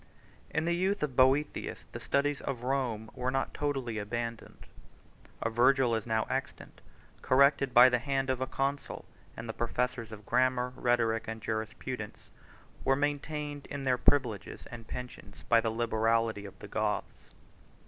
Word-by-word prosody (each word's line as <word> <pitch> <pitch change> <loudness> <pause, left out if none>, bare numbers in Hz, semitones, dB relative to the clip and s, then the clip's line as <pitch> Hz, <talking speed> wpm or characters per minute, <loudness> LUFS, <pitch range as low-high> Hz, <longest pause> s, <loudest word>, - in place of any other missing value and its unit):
In 155 - -1
the 170 - +2
youth 190 +1 0
of 140 -4 -2
Boethius 135 +3 +2
the - - -6
studies 145 +1 0
of 125 -4 -4
Rome 125 -5 -1
were 125 0 -2
not 135 +1 -1
totally 135 -6 -2
abandoned; 115 +2 -5 0.8
a 115 - 0
Virgil 130 +2 +4
90 110 -2 0
is - - -15
now 110 -1 +2
extant, - - -5 0.4
corrected 140 0 +4
by 120 +1 +9
the 125 -1 +2
hand 135 +1 0
of 130 -1 -2
a 130 - 0
consul; 140 +1 -2 0.3
and 115 - -6
the 115 - -3
professors 120 0 -2
of 105 -1 -10
grammar, 125 +1 +2
rhetoric, 115 -3 +1
and 115 0 -4
jurisprudence, 110 +1 -5 0.5
were 135 - +3
maintained 145 0 -2
in 140 -1 -5
their 125 -2 +2
privileges 120 -9 +1
and 115 -2 -9
pensions 125 0 -8
by 115 -1 +5
the 115 - 0
liberality 115 -1 +1
of 100 -1 -10
the - - -10
Goths. - - -3
125 Hz, 160 wpm, -31 LUFS, 115-135 Hz, 0.8 s, by